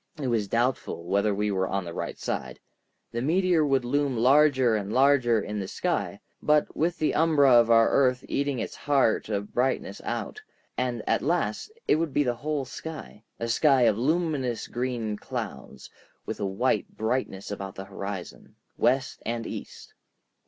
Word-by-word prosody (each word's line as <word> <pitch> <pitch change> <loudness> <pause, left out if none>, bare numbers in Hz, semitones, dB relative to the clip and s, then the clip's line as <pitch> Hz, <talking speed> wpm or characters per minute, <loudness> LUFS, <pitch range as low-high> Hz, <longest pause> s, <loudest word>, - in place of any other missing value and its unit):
It 135 -3 -2
was 110 -4 0
doubtful 120 -6 -1
whether 100 +4 +1
we 105 +1 0
were 95 -1 0
on 95 -1 -2
the 85 - -6
right - - -4
side. - - -4 0.5
The 120 - -3
meteor 175 +3 +2
would 135 -4 +1
loom 140 0 0
larger 130 -1 +4
and 100 -1 -3
larger 130 -3 +4
in 105 0 -4
the 95 - -4
sky, - - -2 0.2
but 150 0 +2
with 170 +3 0
the 155 - +1
umbra 150 -4 +4
of 120 -1 +6
our 115 -1 +6
earth 130 -2 +2
eating 140 -1 -1
its - - -4
heart 140 -7 +1
of 100 -1 -3
brightness 135 - -1
out, 430 - -4 0.3
and 125 -3 -2
at - - +2
last 160 - -1 0.2
it - - +4
would 160 -3 -2
be 145 - +4
the 125 -3 0
whole 145 +3 -3
sky, 150 -5 -8 0.2
a 115 - -2
sky 135 +3 +4
of 110 -3 +4
luminous 140 -2 -1
green 120 -4 -3
clouds, - - -7 0.4
with - - -5
a 100 - -1
white 115 +7 -1
brightness 110 -4 -2
about 100 -1 -6
the 95 - -7
horizon, 100 -1 -7 0.2
west 135 +2 +1
and 115 0 -3
east. - - -8
125 Hz, 170 wpm, -27 LUFS, 105-145 Hz, 0.5 s, of